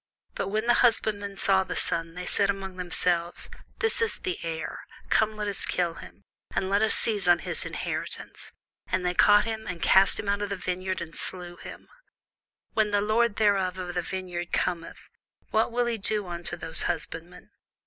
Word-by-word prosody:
But - - -2
when 215 +3 -1
the 240 - +5
husbandmen 205 -4 +2
saw 190 -1 +4
the - - -5
son, 165 0 -1
they 180 0 -5
said 200 +2 +1
among 195 -1 -3
themselves, 175 -1 -1 0.3
This 455 0 +1
is 455 - +1
the 370 -2 -3
heir; 165 -1 -4 0.3
come, 220 0 +3
let 210 -1 -3
us 200 - -3
kill 175 -2 0
him, - - -12 0.3
and 190 0 0
let 200 +1 +3
us 220 - +4
seize 205 -4 0
on 175 -1 +7
his - - -3
inheritance. - - -5 0.4
And 185 0 0
they 180 - +1
caught 205 +3 +6
him, 220 -1 -4
and 180 -2 -4
cast 190 +3 +5
him - - -4
out 200 0 +1
of 205 - -2
the 200 - -1
vineyard, 185 0 -3
and 165 -1 -7
slew 180 -1 -6
him. - - -10 0.9
When 215 -1 +2
the 205 0 +2
lord 215 +2 +2
therefore 190 -3 +2
of - - -4
the 175 - 0
vineyard 175 -1 -4
cometh, 170 -2 -2 0.4
what 220 +2 +2
will 240 +1 +1
he 235 -2 -1
do 210 +1 +1
unto 175 0 -3
those 165 -1 -2
husbandmen? 165 +1 -5
190 Hz, 190 wpm, -27 LUFS, 175-210 Hz, 0.9 s, on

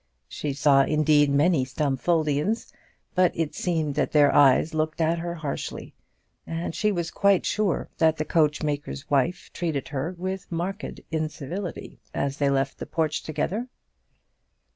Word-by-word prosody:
She 145 -2 -4
saw, 140 0 +4
indeed, 150 0 +3
many 145 +1 +3
Stumfoldians, 150 - 0 0.4
but 185 -1 +4
it 160 -2 -1
seemed 160 -4 -1
that 150 - -1
their 145 -2 +5
eyes 145 +3 +5
looked 155 0 -1
at 165 +1 +2
her 170 0 -4
harshly, 150 -4 -5 0.5
and 165 0 -3
she 210 +3 +1
was 170 -4 -2
quite 200 -2 +3
sure 210 -5 0
that 160 -1 +4
the 155 - -2
coachmaker's 150 - -1
wife 165 +6 0
treated 160 -6 -2
her 150 +5 -3
with 185 +1 -5
marked 185 +5 -4
incivility 160 +3 -4 0.2
as 140 0 -1
they 140 -1 +2
left 135 0 0
the - - -6
porch 155 -2 -1
together. 180 - -2
155 Hz, 140 wpm, -25 LUFS, 145-175 Hz, 0.5 s, their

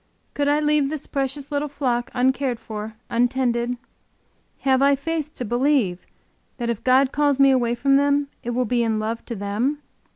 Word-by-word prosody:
Could 285 0 0
I 290 +1 +3
leave 300 -2 +2
this 305 -1 -4
precious 275 0 -3
little 290 +1 -1
flock, 255 -4 -1
uncared 255 -1 +1
for, 215 0 -7 0.2
untended? 245 0 +1 0.8
Have 265 -1 +3
I 280 0 +5
faith 305 +1 -3
to 250 - -4
believe 240 -6 +1 0.5
that 235 -2 -1
if 225 - -5
God 260 +1 +4
calls 290 -2 +1
me 275 0 +6
away 240 -2 +2
from 275 +3 +3
them, 285 0 +2
it 240 - -5
will 250 +1 0
be 240 +1 +1
in 225 -2 +1
love 220 +2 -3
to 235 - -5
them? 210 +8 -1
260 Hz, 175 wpm, -23 LUFS, 235-285 Hz, 0.8 s, me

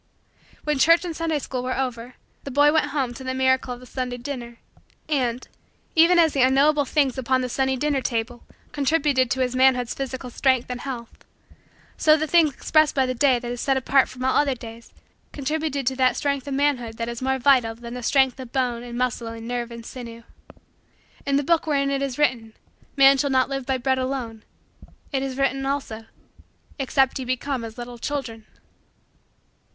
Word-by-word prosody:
When 300 -2 -1
church 335 +5 +5
and 335 -2 -4
Sunday 325 -1 -1
school 260 -3 -4
were 255 +1 -3
over 250 -2 -4 0.3
the - - -6
boy 290 +2 +4
went 315 - +2
home 265 -5 -2
to 260 - -10
the 260 0 -3
miracle 260 -1 +1
of - - -14
the 250 - -13
Sunday 250 -1 -4
dinner. 240 -2 -7 0.5
And, 255 -5 -1 0.5
even 335 +2 +6
as 325 -3 +4
the 275 - +1
unknowable 280 +3 +4
things 275 -2 +1
upon 260 0 +1
the 255 - -2
Sunday 265 +1 0
dinner 285 +1 0
table 240 0 -3 0.3
contributed 280 -3 +1
to 260 0 -1
his 255 0 0
manhood's 255 -2 +3
physical 260 -2 -5
strength 260 -1 +1
and 245 - -5
health, 245 -4 -7 0.7
so 310 0 +5
the 315 - -1
things 320 -1 +4
expressed 310 +3 +2
by 265 -2 +3
the 255 - -1
day 260 0 +3
that 240 0 -5
is 245 - -5
set 270 -1 +1
apart 265 +1 +3
from 255 0 -6
all 260 - +2
other 285 -2 +2
days 230 -1 -11 0.4
contributed 295 -1 -2
to 260 +2 0
that 255 -2 +3
strength 280 -1 -1
of 275 - -2
manhood 255 -6 0
that 230 - -3
is 235 +1 -5
more 265 0 0
vital 250 -4 +3
than 235 0 -9
the 250 - -6
strength 265 +1 +2
of 255 -2 -8
bone 245 -3 -1
and 240 0 -7
muscle 245 -2 -1
and 225 0 -7
nerve 240 -1 -3
and 235 -1 -10
sinew. 235 -2 -9 1.0
In 280 - +2
the 285 - +2
book 330 +2 +1
wherein 275 -2 +1
it 275 0 -1
is 275 -3 -3
written: 235 -7 0 0.4
"Man 275 0 +6
shall 280 - +1
not 260 -1 +2
live 270 -2 -4
by 265 -1 +1
bread 260 +1 0
alone," 255 -4 -4 0.7
it 270 - -1
is 265 -1 -4
written, 270 0 0
also: 265 -5 -4 0.7
"Except 270 0 +1
ye - - -3
become 255 0 -2
as 225 0 -8
little 240 0 -8
children." 230 -6 -5
260 Hz, 195 wpm, -23 LUFS, 245-280 Hz, 1.0 s, even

